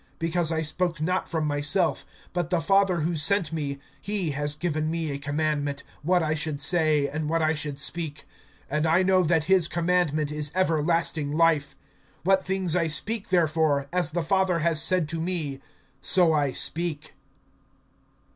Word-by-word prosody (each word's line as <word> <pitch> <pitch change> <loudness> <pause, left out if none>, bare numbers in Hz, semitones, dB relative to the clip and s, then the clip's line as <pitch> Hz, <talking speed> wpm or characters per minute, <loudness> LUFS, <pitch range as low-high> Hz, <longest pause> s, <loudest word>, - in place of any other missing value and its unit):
(49)Because 165 0 0
I 160 0 0
spoke 165 +1 -2
not 180 +4 -1
from 160 -3 -1
myself; 150 +5 0 0.3
but 175 -2 -2
the 175 -2 +1
Father 190 0 +2
who 165 +2 -1
sent 165 +2 +1
me, 145 -3 -3 0.2
he 195 -4 -1
has 145 +1 -3
given 155 -1 -2
me 165 -2 -2
a 140 - -4
commandment, 145 -1 -2 0.2
what 175 +3 +2
I 155 0 0
should 155 -2 -2
say, 155 -2 +2
and 150 +1 -4
what 165 0 +1
I 155 0 +2
should 150 -2 -3
speak. 150 +1 -1 0.5
(50)And 150 +2 0
I 170 +4 +3
know 185 0 +3
that 165 -2 +1
his 185 -1 +3
commandment 170 -4 0
is 150 -1 0
everlasting 165 -4 +1
life. 155 -4 +2 0.5
What 190 +2 +3
things 190 -3 0
I 170 -2 +1
speak 200 +8 -1
therefore, 155 -5 +1
as 180 -4 0
the 170 +2 -2
Father 190 +1 +1
has 165 -1 +2
said 180 -2 +2
to 165 0 -3
me, 160 -6 -3 0.4
so 175 +1 +4
I 145 -3 +1
speak. 155 +2 -1
160 Hz, 165 wpm, -25 LUFS, 150-175 Hz, 0.5 s, so